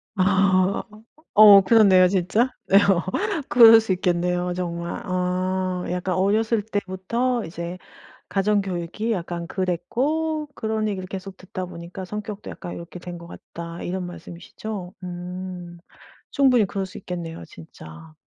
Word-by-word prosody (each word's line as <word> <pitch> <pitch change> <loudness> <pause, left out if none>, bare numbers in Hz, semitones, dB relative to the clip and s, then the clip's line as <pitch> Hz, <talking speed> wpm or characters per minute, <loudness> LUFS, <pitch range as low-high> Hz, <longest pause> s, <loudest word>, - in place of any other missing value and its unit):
아. 190 0 +2
어 210 +1 -16 0.3
어 205 -2 +9
그렇네요 190 -3 +6
진짜. 200 +6 +1 0.2
네. - - +2
어. 190 -3 +3 0.5
그럴 225 -2 +8
수 215 -4 -1
있겠네요 180 0 0
정말. 170 -1 -4
아. 185 0 -1
"약간 180 0 -2
어렸을 215 +4 +2
때부터 220 +4 -2
이제 170 +2 -6 0.5
가정교육이 195 +1 -1
약간 170 -2 -4
그랬고 280 - -1
그런 220 -1 -2
얘기를 190 -2 -4
계속 190 0 -7
듣다 185 0 -6
보니까 175 +2 -9
성격도 210 +1 -6
약간 175 - -7
요렇게 170 +1 -9
된 175 0 -8
것 170 - -11
같다." 170 0 -9
이런 185 +1 -3
말씀이시죠? 180 +2 -8
음. 180 -1 -7 0.5
충분히 255 -5 +4
그럴 195 0 -3
수 185 - -12
있겠네요 170 - -6
진짜. 80 -1 -13
185 Hz, 280 characters per minute, -23 LUFS, 175-210 Hz, 0.5 s, 어